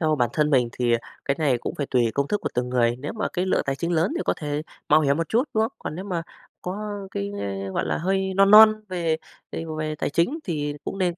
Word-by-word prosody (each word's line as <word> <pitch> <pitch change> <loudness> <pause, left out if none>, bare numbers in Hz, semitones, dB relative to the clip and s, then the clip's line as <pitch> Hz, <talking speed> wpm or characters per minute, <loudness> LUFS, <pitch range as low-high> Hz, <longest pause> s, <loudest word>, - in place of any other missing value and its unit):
theo 155 -2 +2
bản 120 -2 +1
thân 150 -1 +1
mình 125 -4 +3
thì, 120 -1 0
à, 115 - +3 0.3
cái 140 - +1
này 140 -6 +2
cũng - - -5
phải 145 - -3
tùy 120 -3 +3
công 140 0 0
thức 210 - 0
của - - -2
từng 125 0 -1
người. 120 -1 +2
Nếu 145 +3 -5
mà 220 - -2
cái 180 +1 -1
lượng - - +2
tài 135 0 0
chính 170 +3 -2
lớn 165 - +2
thì - - -1
có - - +1
thể 150 0 -3 0.3
mạo 155 +1 +6
hiểm 140 -1 +2
một 165 -1 -2
chút, 240 +5 +2
đúng 220 - +3
không? 230 - -4
Còn - - -5
nếu 185 +3 -6
mà 180 -4 -2 0.4
có 185 +3 -4 0.3
cái, 100 0 -3
a, 100 -1 -4
gọi - - 0
là, - - -1
hơi 190 +2 0
non 195 +1 +5
non 215 0 +9
về 170 -3 0 0.4
về 165 - -4
về 155 0 -2
tài 145 - -2
chính 170 - +1
thì 150 -4 -2
cũng 195 - -4
nên 180 -2 +1
155 Hz, 275 wpm, -24 LUFS, 135-185 Hz, 0.4 s, non